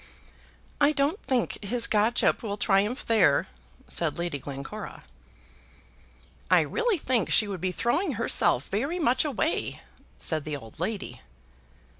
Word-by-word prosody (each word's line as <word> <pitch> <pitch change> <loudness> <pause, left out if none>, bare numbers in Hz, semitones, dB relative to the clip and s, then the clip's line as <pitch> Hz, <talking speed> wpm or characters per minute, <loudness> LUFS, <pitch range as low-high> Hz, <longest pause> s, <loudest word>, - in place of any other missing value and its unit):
"I 290 +1 +5
don't 300 +7 0
think 250 -4 -2
his 235 +3 +2
godship 220 +3 +2
will 205 -3 -4
triumph 205 +5 +1
there," 205 -11 +3 0.4
said - - -1
Lady 170 -4 -3
Glencora. 140 +10 -8 1.5
"I - - +6
really 470 -4 0
think 255 -5 0
she 215 - +5
would 190 -4 -5
be 185 0 -1
throwing 285 - 0
herself 205 - +2
very 275 - -1
much 260 -7 +2
away," 310 +2 -2 0.4
said 155 -3 -2
the 150 -1 -4
old 115 -2 -14
lady. 180 - -4
220 Hz, 130 wpm, -27 LUFS, 180-265 Hz, 1.5 s, I